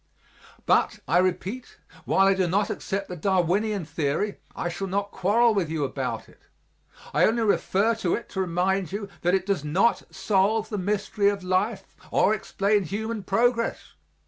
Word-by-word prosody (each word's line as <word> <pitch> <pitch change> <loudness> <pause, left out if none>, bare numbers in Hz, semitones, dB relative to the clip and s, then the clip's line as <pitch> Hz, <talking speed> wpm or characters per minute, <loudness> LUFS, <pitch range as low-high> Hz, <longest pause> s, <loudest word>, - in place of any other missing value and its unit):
But, - - +2
I 165 +6 +4
repeat, 185 +6 -2 0.3
while 195 - +3
I 195 - +5
do 190 -2 +1
not 200 +4 +1
accept 195 0 -3
the 180 - -6
Darwinian 190 +2 0
theory 160 +6 -2 0.2
I - - -2
shall 175 +3 -4
not 200 +2 -2
quarrel 220 +5 +3
with 190 -6 0
you 160 -2 -1
about 135 - -3
it; - - -21 0.7
I - - +4
only 230 +1 +1
refer 210 +1 +2
to 205 -6 0
it 235 - -6
to 190 - -2
remind 185 0 0
you 200 +1 -4
that 175 +2 +2
it 190 -1 -1
does 195 -7 -1
not 180 +10 +2
solve 205 +3 +1
the 210 - -3
mystery 200 +1 +1
of 200 -2 -3
life 190 +2 -1
or 210 - +3
explain 200 -1 0
human 220 +5 -3
progress. 230 +4 0
195 Hz, 170 wpm, -25 LUFS, 180-210 Hz, 0.7 s, I